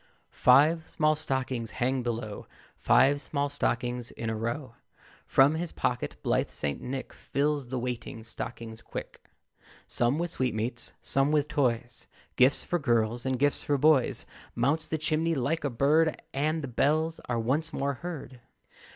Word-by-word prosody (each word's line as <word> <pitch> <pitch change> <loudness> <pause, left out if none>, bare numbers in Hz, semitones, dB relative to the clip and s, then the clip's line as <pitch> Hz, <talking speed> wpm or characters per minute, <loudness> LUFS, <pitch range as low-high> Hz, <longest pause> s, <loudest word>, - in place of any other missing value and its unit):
Five 155 +6 +4
small 155 0 +2
stockings 130 -6 -2
hang 130 +1 +1
below; 115 -3 -4 0.3
Five 140 +2 +4
small 145 -1 -1
stockings 125 -3 -1
in 115 -1 -4
a - - -2
row. 115 +3 -3 0.5
From 135 +3 +5
his 165 +1 -3
pocket 125 0 -2
blithe - - +1
St. 70 -1 -1
Nick 130 0 -5
Fills 145 -1 -1
the 130 +1 -3
waiting 120 -1 -4
stockings 115 0 -7
quick; - - -8 0.6
Some 120 +4 +1
with 170 0 -2
sweetmeats, 120 -1 -2
some 135 +2 +2
with 150 -1 +2
toys, 125 -5 -1 0.3
Gifts 130 +2 +4
for 175 - -1
girls, 120 -2 +1
and 130 -1 0
gifts 145 +2 +2
for 145 - +1
boys, 145 -2 +3 0.3
Mounts 145 +6 +1
the 160 - -1
chimney 155 +2 0
like 145 +5 -1
a 145 - 0
bird, 150 +6 +2
And 155 +3 0
the - - -3
bells 155 +6 +1
are 120 - 0
once 145 +8 0
more 140 -2 -1
heard. 145 -4 -7
135 Hz, 150 wpm, -28 LUFS, 120-150 Hz, 0.6 s, From